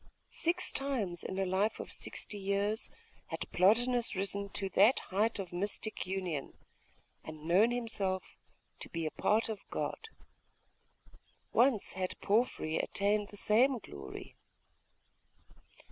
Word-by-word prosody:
Six 350 +2 +1
times 240 -11 -1
in 190 - -4
a 195 - +1
life 190 +4 +1
of - - -6
sixty 205 - -3
years 200 +2 0 0.4
had - - -5
Plotinus 235 +6 +3
risen 200 +1 -1
to 195 - -1
that 210 +7 +5
height 210 +4 0
of 190 -3 -5
mystic 205 +3 -2
union, 180 -7 -3 0.7
and 155 -1 -9
known 185 +8 +5
himself 215 -6 -2 0.4
to - - -6
be 165 -1 -3
a 155 - -1
part 220 +2 +2
of 220 -3 -4
God. 450 - -3 1.4
Once 240 -4 +3
had 185 0 -3
Porphyry 205 -7 +1
attained 205 +1 +1
the 205 - -7
same 245 +7 +4
glory. 70 - -9
200 Hz, 125 wpm, -33 LUFS, 185-225 Hz, 1.4 s, that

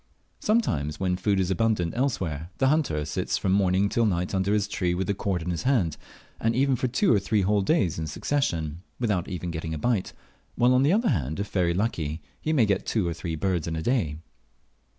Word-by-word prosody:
Sometimes, 75 - 0
when 90 -1 +1
food 95 +2 +1
is 95 0 0
abundant 95 -4 +1
elsewhere, 90 - -1
the 135 - +3
hunter 135 - +1
sits 75 - -1
from 95 - 0
morning 95 0 +3
till 115 +2 +1
night 90 -1 -1
under 95 +1 +1
his 105 -1 +2
tree 90 -4 -1
with 95 +2 -1
the 100 - 0
cord 95 -3 -2
in 90 - -2
his 85 - -2
hand, 115 - +1 0.4
and 115 +1 +1
even 135 +1 +3
for 130 - -1
two 130 - +2
or 105 - +4
three 100 +2 +1
whole 100 +2 +2
days 95 - +1
in 80 - -3
succession, 85 - -1 0.2
without 105 -8 0
even 90 -2 -4
getting 80 0 -4
a - - -3
bite; 110 +3 0 0.4
while, 125 +1 +4
on 130 - +4
the 140 +4 +4
other 225 +4 +3
hand, 75 +1 -1
if 100 +1 -3
very 85 -3 +1
lucky, 85 -7 -1 0.2
he 155 - -1
may 135 -8 +4
get 100 -2 0
two 105 -6 +1
or 85 - -1
three 85 0 -4
birds 90 -1 -1
in 80 - -2
a 80 - -3
day. 95 - 0
95 Hz, 220 wpm, -26 LUFS, 85-115 Hz, 0.4 s, or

